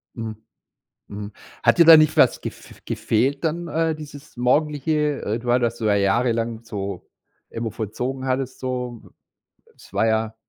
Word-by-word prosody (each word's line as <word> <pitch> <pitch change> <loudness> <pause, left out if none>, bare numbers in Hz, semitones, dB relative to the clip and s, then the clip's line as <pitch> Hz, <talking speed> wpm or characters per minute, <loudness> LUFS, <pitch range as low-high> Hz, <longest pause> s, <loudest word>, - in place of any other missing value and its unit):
Mhm. 110 -2 -5 0.7
Mhm, 105 +1 -7 0.3
hat - - +4
dir 170 - +8
da 165 -1 +11
nicht 155 0 +4
was - - +4
gef - - -9
gefehlt 135 +7 0
dann 170 +2 -1
äh, 160 +1 0
dieses 145 -3 -12
Morgendliche 150 +3 +1
äh, 110 +3 -2
du 120 0 -2
hat 125 - +3
das 120 0 0
du 110 - -4
ja 105 -1 +3
jahrelang 115 +2 0
so 100 -4 -6 0.4
irgendwo 115 -1 -4
vollzogen 120 +5 -4
hattest 130 0 -2
so? 125 -2 -4 0.7
Es - - -18
war 110 - +2
ja 110 0 0
125 Hz, 160 wpm, -22 LUFS, 110-145 Hz, 0.7 s, da